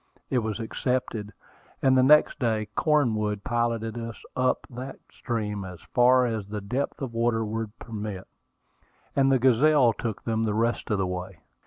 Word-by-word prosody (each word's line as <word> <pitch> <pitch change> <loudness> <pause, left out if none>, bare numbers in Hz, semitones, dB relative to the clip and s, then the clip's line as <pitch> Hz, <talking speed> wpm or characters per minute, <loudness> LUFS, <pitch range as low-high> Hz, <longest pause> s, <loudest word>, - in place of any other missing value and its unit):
It 130 - +3
was 110 -1 -3
accepted; 115 -2 -2 0.5
and 130 -1 +4
the 130 - +5
next 150 +4 +5
day 110 -4 0
Cornwood 110 -9 +1
piloted 115 -1 -1
us 115 -2 -7
up 130 0 +1
that 130 +2 -7
stream 105 -4 -3
as 90 -2 -8
far 125 +1 +5
as 110 -4 -2
the 105 +1 -4
depth 125 +8 -3
of 125 -3 -4
water 115 -1 +1
would 110 0 -4
permit, 105 -4 -6 0.9
and 135 -1 +4
the 135 - +5
Gazelle 130 0 +4
took 110 0 -4
them 115 -1 0
the 105 -2 0
rest 115 +2 0
of 105 - +1
the 95 - 0
way. 90 0 -5
115 Hz, 165 wpm, -26 LUFS, 105-125 Hz, 0.9 s, the